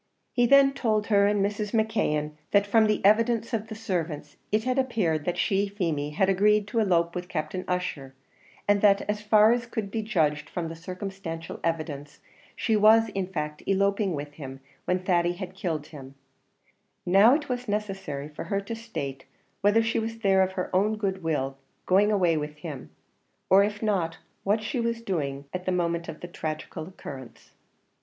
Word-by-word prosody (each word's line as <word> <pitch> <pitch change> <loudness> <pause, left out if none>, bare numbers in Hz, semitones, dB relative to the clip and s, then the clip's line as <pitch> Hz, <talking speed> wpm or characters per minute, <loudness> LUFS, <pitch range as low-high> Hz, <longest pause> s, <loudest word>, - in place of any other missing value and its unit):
He 245 -1 +3
then 275 +1 +6
told 215 -6 0
her 200 0 +5
and 205 -1 +2
Mrs. 205 +1 -3
McKeon, 215 -10 +1 0.2
that 200 0 +4
from 220 +2 +4
the 210 -2 0
evidence 230 +3 +3
of 220 -1 -1
the 220 - -7
servants 175 -8 -3 0.2
it 215 +1 +2
had 255 +2 0
appeared 185 - 0
that 175 - -1
she, 200 -1 +1
Feemy, 165 -8 -2
had 175 +6 +1
agreed 205 +2 +3
to 230 - 0
elope 170 -5 +2
with 180 0 -5
Captain 180 +3 -3
Ussher; 155 -7 -3 0.5
and 205 0 +3
that, 200 -1 +5
as 210 0 -1
far 215 +1 +5
as 240 0 0
could 220 -4 -4
be 225 - -1
judged 155 -9 0
from 165 -2 -4
circumstantial 180 -1 -6
evidence, 155 -3 -3 0.4
she 225 - +1
was 220 +2 +6
in 195 -2 -3
fact 150 -4 -4
eloping 200 -1 +1
with 145 0 -6
him 135 -3 -8 0.3
when 180 - +1
Thady 175 -2 +2
had 185 0 -7
killed 165 -6 -3
him; 135 -2 -10 0.9
now, 200 +8 +6
it 295 -1 -3
was 250 -1 -3
necessary 195 -9 -3
for 150 - -8
her 200 -2 -1
to 200 +4 -5
state 155 -13 -6 0.4
whether 205 +3 +4
she 225 +1 0
was 225 0 -4
there 195 -3 +3
of 190 0 +1
her 185 0 -3
own 210 +3 +2
good 195 -2 -2
will, 135 -4 -2 0.3
going 200 +3 +4
away 180 -5 +3
with 150 0 -4
him; 150 -4 -7 0.6
or 195 +1 +7
if 205 +1 -3
not, 175 -6 0 0.3
what 210 +2 +1
she 245 +4 -2
was 235 0 -1
doing 145 -9 -2
at 185 0 -4
the - - +2
moment 170 -1 -1
of - - -8
the 175 - -6
tragical 155 -1 -5
occurrence. 135 -9 -10
195 Hz, 180 wpm, -27 LUFS, 165-215 Hz, 0.9 s, or